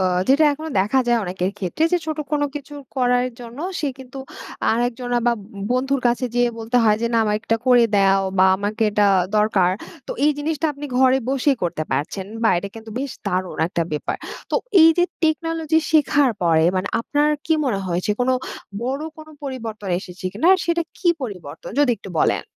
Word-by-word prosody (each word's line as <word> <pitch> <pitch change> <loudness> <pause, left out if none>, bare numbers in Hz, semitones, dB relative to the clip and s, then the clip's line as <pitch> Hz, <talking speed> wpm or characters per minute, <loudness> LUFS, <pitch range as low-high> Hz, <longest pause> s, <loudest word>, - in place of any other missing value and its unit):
অ - - +1 0.3
যেটা 285 +4 +5
এখনো 310 +2 -6
দেখা 215 +7 +2
যায় 240 -1 +3
অনেকের 180 +1 -2
ক্ষেত্রে। 190 - -3
যে 355 - +4
ছোট 310 -1 -3
কোন 290 -1 +1
কিছু 290 0 -7 0.2
করার 250 0 +2
জন্য 240 +2 -10 0.2
সে 295 - 0
কিন্তু 265 +1 -10 0.5
আরেকজন 245 +1 -1 0.2
বা, 240 - +5
ব - - -10 0.3
বন্ধুর 270 +2 0
কাছে 240 +2 +1
যেয়ে 245 0 +3
বলতে 225 +2 -1
হয় 210 -1 +4
যে, - - +2
"না, - - +4
আমার 210 0 +1
একটা 225 0 0
করে 245 -2 +6
দেও 195 0 +4 0.2
বা, 190 - +7
আমাকে 210 +3 -2
এটা 205 0 +3 0.3
দরকার।" 205 -4 +3 0.4
তো - - -3
এই 300 - +5
জিনিসটা 315 +1 -1
আপনি 290 +1 -7
ঘরে 260 0 +5
বসেই 275 0 +2
করতে 170 -3 -1
পারছেন। 155 +8 -2 0.2
বাহ! 220 - +4
এটা 200 - -5
কিন্তু 225 0 -10
বেশ 275 0 -3 0.2
দারুণ 185 -1 -2
একটা 170 - -1
ব্যাপার। 150 - -2 0.3
তো - - +2 0.3
এইযে 325 +2 +6 0.2
টেকনোলজি 320 0 +1
শেখার 290 -3 +4
পরে 160 -1 +4
মানে 185 +2 -1
আপনার 295 +5 +1 0.2
কী 320 - +3
মনে 220 -7 0
হয়েছে 180 +3 -1
কোনো 255 +1 +2 0.5
বড় 270 +5 -2
কোন 310 - -11 0.2
পরিবর্তন 225 -7 -6
এসেছে 185 -1 -11
কিনা? 215 - -1
আর 375 - 0
সেটা 340 0 +1 0.2
কী 355 - +1
পরিবর্তন? 185 - -7
যদি 290 -3 +4
একটু 195 - -10
বলেন। - - +2
245 Hz, 190 wpm, -21 LUFS, 200-290 Hz, 0.5 s, বা